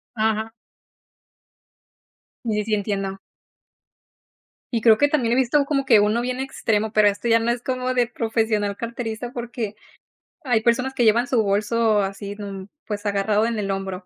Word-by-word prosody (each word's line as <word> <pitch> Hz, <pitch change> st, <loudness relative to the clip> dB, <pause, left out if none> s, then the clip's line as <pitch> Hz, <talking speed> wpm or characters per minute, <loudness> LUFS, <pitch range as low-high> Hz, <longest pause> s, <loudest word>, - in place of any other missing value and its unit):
Ajá. 220 Hz, 0 st, 0 dB, 1.9 s
Sí, 225 Hz, -, -1 dB
sí, 210 Hz, -, 0 dB
sí, 220 Hz, -, -2 dB
entiendo. 195 Hz, -2 st, -2 dB, 1.6 s
Y 230 Hz, -, 0 dB
creo 220 Hz, -1 st, +6 dB
que, 290 Hz, -, +4 dB
también 255 Hz, -6 st, +1 dB
he -, -, +3 dB
visto 265 Hz, +3 st, +3 dB
como 275 Hz, -1 st, 0 dB
que 230 Hz, -5 st, +6 dB
uno 210 Hz, +3 st, +2 dB
bien 250 Hz, +1 st, -3 dB
extremo, 220 Hz, -5 st, -1 dB
pero 215 Hz, -1 st, +4 dB
esto 205 Hz, +3 st, -1 dB
ya 230 Hz, 0 st, +5 dB
no 230 Hz, +1 st, 0 dB
es 240 Hz, 0 st, -3 dB
como 255 Hz, 0 st, -2 dB
de 245 Hz, -2 st, +2 dB
profesional 220 Hz, -3 st, -1 dB
carterista, 235 Hz, +1 st, -5 dB
porque 235 Hz, -4 st, -5 dB, 0.7 s
hay 245 Hz, -5 st, +2 dB
personas 250 Hz, +3 st, +1 dB
que 245 Hz, -, +1 dB
llevan 230 Hz, +2 st, +4 dB
su 245 Hz, -3 st, +2 dB
bolso 215 Hz, +1 st, +2 dB
así, 200 Hz, +1 st, -5 dB
de 205 Hz, -, -8 dB
un, 195 Hz, -1 st, -7 dB, 0.2 s
pues, 205 Hz, -1 st, -4 dB
agarrado, 205 Hz, +2 st, +1 dB
en 230 Hz, -1 st, -2 dB
el 200 Hz, -2 st, -2 dB
hombro, 195 Hz, -1 st, -4 dB
225 Hz, 170 wpm, -22 LUFS, 205-240 Hz, 1.9 s, creo